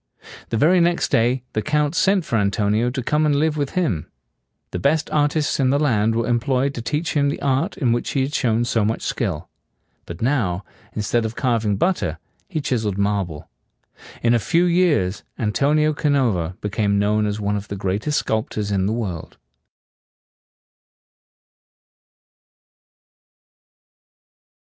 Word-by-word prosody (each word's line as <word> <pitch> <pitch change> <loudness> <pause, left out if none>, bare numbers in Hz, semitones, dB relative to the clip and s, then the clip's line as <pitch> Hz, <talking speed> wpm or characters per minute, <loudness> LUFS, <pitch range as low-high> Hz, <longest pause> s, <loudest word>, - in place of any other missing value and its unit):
The 115 - -1
very 175 +8 +4
next 170 0 +1
day 120 +3 +2
the 110 - 0
Count 150 +2 0
sent 190 0 +2
for 120 - -2
Antonio 105 +2 +1
to 130 0 -4
come 150 +5 +1
and 150 -2 +2
live 155 +1 +1
with 145 -2 -2
him. 115 - -1 0.6
The 90 - -3
best 155 - +1
artists 150 0 +1
in 130 -2 +3
the 140 - +3
land 115 -7 +2
were 115 0 0
em 120 -1 +1
ployed 130 +3 0
to 120 - -5
teach 150 +6 -2
him 145 -1 +2
the - - -3
art 140 +7 0
in 130 -10 +1
which 120 +1 -1
he 135 - +1
had 140 +2 -3
shown 120 -4 +1
so 115 -2 +1
much 110 +2 -1
skill; 90 -10 -2 0.6
but 85 0 -7
now, 110 -8 0 0.3
instead 110 +2 0
of 110 0 -4
carving 115 -5 0
butter, 95 - 0 0.3
he 160 -5 -2
chis 125 -5 -1
eled 100 -2 -2
marble. 100 -6 -1 0.8
In 115 0 +4
a 120 - +3
few 165 - +2
years, 170 - +2 0.2
Antonio 145 +8 +2
Canova 120 - 0
became 105 -1 0
known 105 +1 +2
as 105 0 -3
one 105 0 -1
of 100 0 -4
the 100 - -5
greatest 100 +10 -1
sculptors 110 -1 -2
in 95 -1 +1
the 110 - 0
world. 100 -8 -5
120 Hz, 155 wpm, -21 LUFS, 105-145 Hz, 0.8 s, very